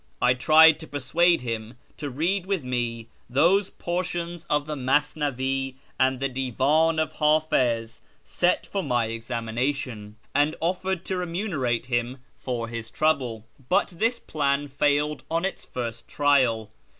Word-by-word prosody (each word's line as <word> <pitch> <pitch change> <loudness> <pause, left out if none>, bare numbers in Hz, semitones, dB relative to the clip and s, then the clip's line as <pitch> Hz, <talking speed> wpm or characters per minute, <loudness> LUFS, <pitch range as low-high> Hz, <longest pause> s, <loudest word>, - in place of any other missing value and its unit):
I 125 - +4
tried 155 +5 +6
to 160 - -10
persuade 170 +4 +2
him 115 -1 -4 0.2
to 145 - -4
read 175 +8 -1
with 195 -6 -1
me 120 -2 -3 0.2
those 180 +10 +3
portions 175 -1 -4
of 150 -1 +1
the 155 0 -4
Masnavi 135 -1 0 0.2
and 130 -1 +2
the 135 - 0
Divan 135 +5 +1
of 155 0 0
Hdfiz 130 -8 +1 0.2
set 180 0 +1
for 200 - -2
my 120 -8 +1
examination, 115 0 -3 0.2
and 145 +2 +2
offered 185 +1 -1
to 190 - -2
remunerate 165 - -1
him 120 0 -1 0.2
for 120 -3 -4
his 115 -1 -6
trouble; 130 -8 0 0.2
but - - +3
this 225 +7 0
plan 145 -6 -1
failed 145 +2 +1
on 165 +3 0
its 195 - -4
first 115 -2 -5
trial. 130 -7 +2
140 Hz, 140 wpm, -25 LUFS, 120-160 Hz, 0.2 s, tried